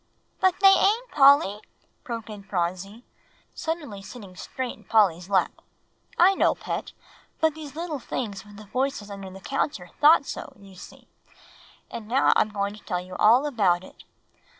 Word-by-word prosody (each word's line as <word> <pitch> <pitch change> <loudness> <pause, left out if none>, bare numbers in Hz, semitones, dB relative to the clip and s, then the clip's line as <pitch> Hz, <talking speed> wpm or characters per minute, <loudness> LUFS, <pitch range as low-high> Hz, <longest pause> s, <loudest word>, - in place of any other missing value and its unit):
'" - - -44
"But 375 -1 +2
they 390 0 +8
ain't, 450 +6 +2
Polly," 270 -8 +5 0.4
broke 230 -2 -6
in 210 -2 -9
Phronsie, 195 +4 -4 0.5
suddenly 300 -12 -5
sitting 195 -3 -11
straight 255 +6 -5
in - - -21
Polly's 190 -5 +2
lap. 190 -2 0 0.6
"I 365 +3 +6
know, - - +2
Pet; - - -5 0.5
but 320 -1 +2
these 300 -2 -10
little 325 -3 -4
things 205 -6 -5
with 205 -1 -15
the 215 - -11
voices 250 -2 -3
under 195 -1 -8
the 190 +1 -11
counter 190 - -3
thought 300 0 +6
so, - - -7
you 195 -1 -15
see. 180 - -14 0.8
And 220 -2 -7
now 260 +4 +3
I'm 215 - +2
going 200 -1 -2
to 210 - -14
tell 180 -4 -2
you 180 +1 -9
all 240 +6 +5
about 195 -10 +1
it. - - -15
215 Hz, 170 wpm, -25 LUFS, 195-285 Hz, 0.8 s, they